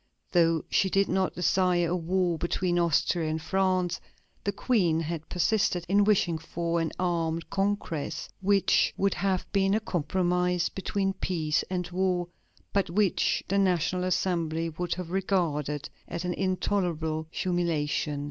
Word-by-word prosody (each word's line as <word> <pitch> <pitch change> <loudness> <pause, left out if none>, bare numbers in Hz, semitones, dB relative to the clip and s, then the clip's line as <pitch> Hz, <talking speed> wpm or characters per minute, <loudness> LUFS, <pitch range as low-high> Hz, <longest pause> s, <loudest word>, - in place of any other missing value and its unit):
Though 165 -2 +3
she 190 - +2
did 195 +1 +2
not 190 0 0
desire 180 -1 +2
a 175 - +1
war 175 -1 0
between 175 0 0
Austria 170 0 +1
and 160 +1 -1
France, 185 0 0 0.4
the 200 - 0
Queen 195 -7 +1
had 160 0 -5
persisted 180 -1 +1
in 200 +3 +4
wishing 190 -6 +2
for 170 +1 -2
an 165 - -1
armed 165 -2 -1
congress, 195 -7 -2
which 195 0 +3
would 195 0 +2
have 190 -2 0
been 195 0 +2
a - - +2
compromise 180 -1 0
between 195 0 -1
peace 160 -5 -1
and 180 -2 -2
war, 180 -1 0 0.5
but 195 -3 +1
which 200 +2 +1
the 200 +1 +1
National 180 -1 +1
Assembly 165 -3 0
would 170 +2 -3
have 180 -2 -6
regarded 155 -7 -1 0.2
as 170 +1 -4
an 180 - -1
intolerable 175 -5 -1
humiliation. 160 -5 -1
180 Hz, 140 wpm, -28 LUFS, 165-190 Hz, 0.5 s, in